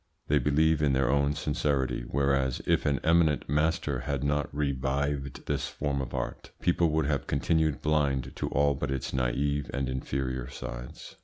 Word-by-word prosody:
They 75 0 +4
believe 75 +3 +3
in 70 -2 +3
their 65 -1 +2
own 70 +1 +2
sincerity, 70 -4 0
whereas, 70 -2 +1
if - - +2
an 70 -1 +2
eminent 80 -2 +3
master 75 -1 +1
had 70 +2 -2
not 75 0 0
revived 70 0 -2
this - - -1
form 70 -1 -2
of 65 0 -5
art, - - -4
people 85 -1 +2
would 80 0 +1
have 70 -1 -1
continued 80 +1 +1
blind 70 -4 +1
to - - -2
all 70 +1 +3
but 70 +1 -3
its 65 -1 -3
naive 65 +2 0
and 70 -1 -1
inferior 65 0 -3
sides. 65 -2 -8
70 Hz, 165 wpm, -29 LUFS, 65-75 Hz, -, They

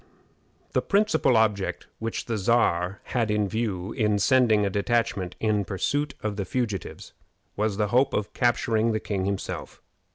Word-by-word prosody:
The - - +1
principal 200 - +2
object 105 -3 0
which 115 0 -3
the 115 - -2
Czar 100 -4 +1
had 115 -3 -1
in 105 -1 +1
view 105 -2 -2
in 105 -4 +1
sending 110 -1 +4
a - - +1
detachment 100 -3 0
in 105 -2 +1
pursuit 145 +10 -1
of 105 -1 -2
the 100 - -1
fugitives 105 -4 -4 0.4
was 105 -1 -1
the 105 -1 0
hope 130 +4 +3
of 105 - -2
capturing 115 -2 +1
the 110 - 0
king 100 -3 -2
himself. 100 0 -4
110 Hz, 155 wpm, -26 LUFS, 100-120 Hz, 0.4 s, sending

